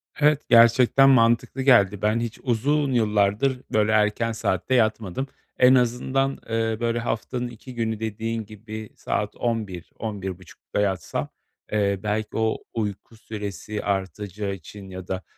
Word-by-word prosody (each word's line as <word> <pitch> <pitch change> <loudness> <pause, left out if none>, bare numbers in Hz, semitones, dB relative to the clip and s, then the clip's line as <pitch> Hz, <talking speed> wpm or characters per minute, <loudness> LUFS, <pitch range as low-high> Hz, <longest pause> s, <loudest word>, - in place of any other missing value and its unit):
Evet, 150 0 +3
gerçekten 120 +3 +6
mantıklı 120 +1 +3
geldi. 105 -7 +4
Ben 105 +2 +2
hiç 115 -1 -4
uzun 140 +4 +1
yıllardır 110 +3 +2
böyle 110 0 +3
erken 110 +2 +2
saatte 110 +2 0
yatmadım. 110 +1 0 0.3
En 125 +1 +7
azından, 130 +2 +1
eee, 115 -1 0
böyle, 120 0 0
haftanın 120 +2 -2
2 120 +2 -11
günü, 110 -2 -2
dediğin 110 +1 -3
gibi, 110 0 -8
saat - - -2
23.00-23.30'da 100 -3 -4
yatsam, 95 -4 -2 0.4
eee, 100 -2 +1
belki 105 0 -2
o 110 0 +1 0.2
uyku 105 0 -4
süresi 105 -1 -6
artacağı 100 0 -3
için 95 +2 -10
ya 95 -1 -8
da, 95 0 -3
110 Hz, 130 wpm, -24 LUFS, 105-120 Hz, 0.4 s, En